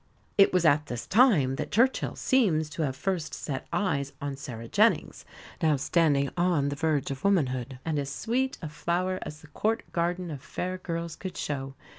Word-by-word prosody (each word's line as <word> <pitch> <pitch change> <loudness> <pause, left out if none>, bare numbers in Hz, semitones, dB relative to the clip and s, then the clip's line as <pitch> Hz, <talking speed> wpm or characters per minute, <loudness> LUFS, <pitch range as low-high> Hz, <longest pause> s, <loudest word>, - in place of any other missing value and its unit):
It 195 - +6
was 180 -2 +2
at 150 -1 +4
this 120 0 -5
time 180 - +4
that - - -3
Churchill 250 +5 +2
seems 165 -13 +2
to 165 - -4
have 135 -4 0
first 175 +1 -2
set 135 -3 -5
eyes 140 -9 0
on 145 -2 -3
Sarah 120 -5 -7
Jennings, - - +2 0.4
now 155 -2 +4
standing 140 -1 +2
on 175 -5 +2
the 145 - -3
verge 150 -3 0
of 135 0 -6
womanhood, 130 -9 +1
and 160 -3 0
as 140 -1 -3
sweet 255 - -1
a 155 - -3
flower 180 +4 -1
as 150 0 -7
the 155 - -14
Court 220 +8 0
garden 175 0 -1
of 140 -3 -6
fair 185 +5 -4
girls 170 -2 -4
could 185 +2 -7
show. 135 -2 -3
155 Hz, 185 wpm, -28 LUFS, 140-185 Hz, 0.4 s, It